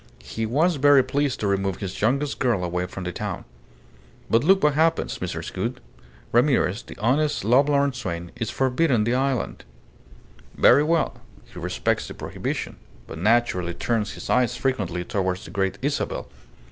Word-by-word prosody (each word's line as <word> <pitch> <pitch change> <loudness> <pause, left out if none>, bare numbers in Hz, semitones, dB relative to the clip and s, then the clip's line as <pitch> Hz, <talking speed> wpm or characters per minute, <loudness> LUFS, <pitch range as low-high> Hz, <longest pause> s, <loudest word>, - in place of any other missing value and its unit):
He 110 0 -4
was 155 +8 +2
very 140 -1 +6
pleased 140 +1 -1
to 105 - 0
remove 95 -1 0
his 95 -3 -6
youngest 140 +6 0
girl 120 -8 +1
away 90 +1 -2
from 95 +1 -7
the 90 - -3
town. - - -5 0.9
But 115 +3 +4
look 190 +4 +4
what 150 -1 +4
happens, 160 - +1
Mrs. - - -5
Gould. - - -3 0.5
Ramirez, 120 -5 +2
the - - -12
honest, 145 +7 +1
lovelorn 140 +4 +3
swain, 85 -8 -5
is 115 -2 -3
forbidden 130 -2 +1
the 120 +3 0
island. 130 0 -1 0.9
Very 145 - +6
well. 165 +2 0 0.2
He - - -11
respects - - -1
the - - -8
prohibition, - - -4 0.3
but 80 - -8
naturally 95 -4 +1
turns 110 0 -1
his - - -8
eyes 125 -1 +2
frequently 95 -11 -1
towards 95 0 -2
the - - -10
Great 95 0 -1
Isabel. 145 +1 -2
120 Hz, 160 wpm, -24 LUFS, 95-140 Hz, 0.9 s, very